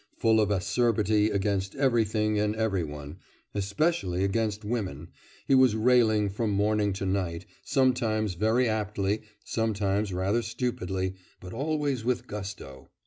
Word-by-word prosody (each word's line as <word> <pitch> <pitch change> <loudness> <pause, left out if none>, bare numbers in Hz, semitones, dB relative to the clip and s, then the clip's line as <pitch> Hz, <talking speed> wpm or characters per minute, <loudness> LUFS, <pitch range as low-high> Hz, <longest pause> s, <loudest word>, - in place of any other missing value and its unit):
Full 110 -1 +4
of 105 - +1
acerbity 105 +1 +2
against 100 -1 -1
everything 110 -5 +1
and 105 0 0
every 110 -5 0
one 75 +1 -8 0.4
especially 100 - 0
against 105 +1 -1
women 95 - -3 0.4
he - - +3
was 130 -4 +5
railing 110 -2 +3
from 110 +2 -1
morning 105 +1 +1
to 95 +1 -4
night, 95 -3 -2 0.2
sometimes 115 -6 +1
very 110 +7 +2
aptly, 105 -1 -1 0.2
sometimes 105 -2 -1
rather 95 +6 0
stupidly, 95 -7 -2 0.3
but 90 0 -9
always 145 -4 -1
with 125 0 -1
gusto. 95 -10 -8
105 Hz, 130 wpm, -28 LUFS, 95-115 Hz, 0.4 s, was